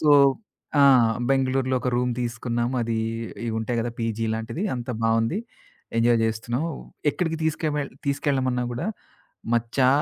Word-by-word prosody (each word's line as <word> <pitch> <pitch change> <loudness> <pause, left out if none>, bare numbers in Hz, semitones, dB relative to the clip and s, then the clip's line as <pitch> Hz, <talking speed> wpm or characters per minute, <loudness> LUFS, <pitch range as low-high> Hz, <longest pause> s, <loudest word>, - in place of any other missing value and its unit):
So 150 -2 +4 0.7
ఆ! - - +7 0.5
బెంగుళూరులో 130 -1 +2
ఒక 125 - -1
రూమ్ 125 0 +1
తీసుకున్నాము. 120 +1 -1
అది 115 -1 -1 0.5
ఇవుంటాయి 110 +2 -1
కదా! 120 - -2
పీజీ 115 0 -1
లాంటిది 115 - -4
అంత 120 0 -6
బావుంది. 115 - +2 0.6
ఎంజాయ్ 115 0 +4
చేస్తున్నాం. 115 +5 -1 0.5
ఎక్కడికి 165 -1 -1
తీసు‌కువెల్ 150 -2 -1 0.2
తీసుకెళ్లమన్నా 135 -3 +1
కూడా, 120 - -3 0.7
"మచ్చా 120 +3 +2
125 Hz, 120 wpm, -25 LUFS, 115-135 Hz, 0.7 s, ఆ